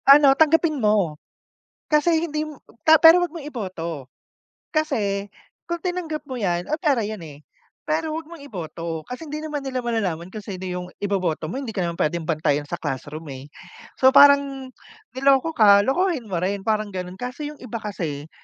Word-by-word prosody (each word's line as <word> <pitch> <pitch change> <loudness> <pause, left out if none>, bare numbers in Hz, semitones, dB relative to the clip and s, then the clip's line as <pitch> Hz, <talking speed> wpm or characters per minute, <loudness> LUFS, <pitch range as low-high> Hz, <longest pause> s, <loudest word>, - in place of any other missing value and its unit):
Ano 280 -1 +9
tanggapin 315 0 +3
mo, 200 -8 +1 0.7
kasi 320 +2 +2
hindim 305 -1 -4 0.2
ta 315 0 +7
pero 330 +3 +8
'wag 350 - -3
mong 315 -4 -8
iboto. 170 - -6 0.6
Kasi 220 -11 -1 0.4
kung 345 0 -4
tinanggap 355 -4 -3
mo 260 - -4
'yan 180 -5 -1
ay 305 - 0
pera 290 -7 +1
'yan 215 0 -4
eh, 145 -1 -12 0.4
pero 310 +1 -1
huwag 320 0 -6
mong 330 -4 -11
iboto 165 - -5
kasi 250 +6 -6
hindi 305 0 -5
naman 300 -3 -4
nila 260 -1 -2
malalaman 195 -8 -2
kung 210 +1 -9
sino 190 -4 -6
yung 180 0 -4
iboboto 185 -6 -1
mo 245 - -4
hindi 265 -5 -5
ka 195 - -2
naman 170 -1 -2
pwedeng 160 +1 -1
bantayan 150 -2 0
sa - - -3
classroom 145 +4 -5
eh. 135 +2 -10 0.5
So 260 0 +5
parang 280 -2 +5 0.5
niloko 270 +3 +3
ka, 200 -2 +7
lokohin 275 - 0
mo 185 - -1
rin 195 +3 -1
parang 215 0 -1
ganon 180 0 -5
kaso 250 +5 -6
yung 300 0 -5
iba 235 -3 -7
kasi, 160 -8 -5
235 Hz, 175 wpm, -23 LUFS, 180-300 Hz, 0.7 s, Ano